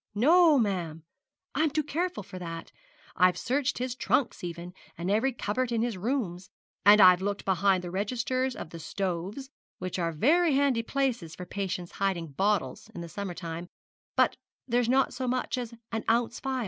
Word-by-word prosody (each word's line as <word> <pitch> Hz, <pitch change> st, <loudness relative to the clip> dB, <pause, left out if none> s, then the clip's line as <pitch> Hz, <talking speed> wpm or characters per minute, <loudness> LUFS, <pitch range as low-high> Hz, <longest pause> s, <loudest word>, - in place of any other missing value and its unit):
'No, 315 Hz, -, +6 dB
ma'am; 175 Hz, -8 st, -1 dB, 0.5 s
I'm 315 Hz, 0 st, +2 dB
too 305 Hz, +1 st, 0 dB
careful 345 Hz, -, -2 dB
for 185 Hz, 0 st, -9 dB
that. 165 Hz, -1 st, -7 dB, 0.4 s
I've 180 Hz, -1 st, +4 dB
searched 270 Hz, +6 st, 0 dB
his 255 Hz, 0 st, -2 dB
trunks 255 Hz, -3 st, 0 dB
even, 175 Hz, 0 st, -6 dB, 0.2 s
and 175 Hz, +3 st, -2 dB
every 225 Hz, +6 st, +2 dB
cupboard 245 Hz, +1 st, -2 dB
in 230 Hz, -1 st, +1 dB
his 235 Hz, -3 st, -1 dB
rooms; 190 Hz, -4 st, -2 dB, 0.3 s
and 205 Hz, +1 st, +8 dB
I've 180 Hz, -2 st, +8 dB
looked 200 Hz, +1 st, -2 dB
behind 190 Hz, 0 st, +2 dB
the 175 Hz, -, -5 dB
registers 250 Hz, +6 st, -1 dB
of -, -, -7 dB
the 165 Hz, -, -8 dB
stoves, 195 Hz, -, -4 dB, 0.3 s
which 185 Hz, 0 st, -4 dB
are 170 Hz, -1 st, 0 dB
very 300 Hz, -, +3 dB
handy 275 Hz, -4 st, +3 dB
places 240 Hz, -, -1 dB
for 180 Hz, -, -7 dB
patients 180 Hz, -2 st, -4 dB
hiding 175 Hz, -5 st, 0 dB
bottles 205 Hz, +7 st, 0 dB
in 170 Hz, -1 st, -6 dB
summer 190 Hz, +1 st, -5 dB
time; 170 Hz, -1 st, -6 dB, 0.5 s
but -, -, +3 dB, 0.3 s
there's 240 Hz, -1 st, +1 dB
not 265 Hz, +1 st, +3 dB
so 255 Hz, -, -3 dB
much 255 Hz, +1 st, -1 dB
as 245 Hz, -2 st, -4 dB, 0.2 s
an 225 Hz, -1 st, -2 dB
ounce 235 Hz, +1 st, +1 dB
phial. 265 Hz, -1 st, -2 dB
205 Hz, 175 wpm, -28 LUFS, 180-255 Hz, 0.5 s, and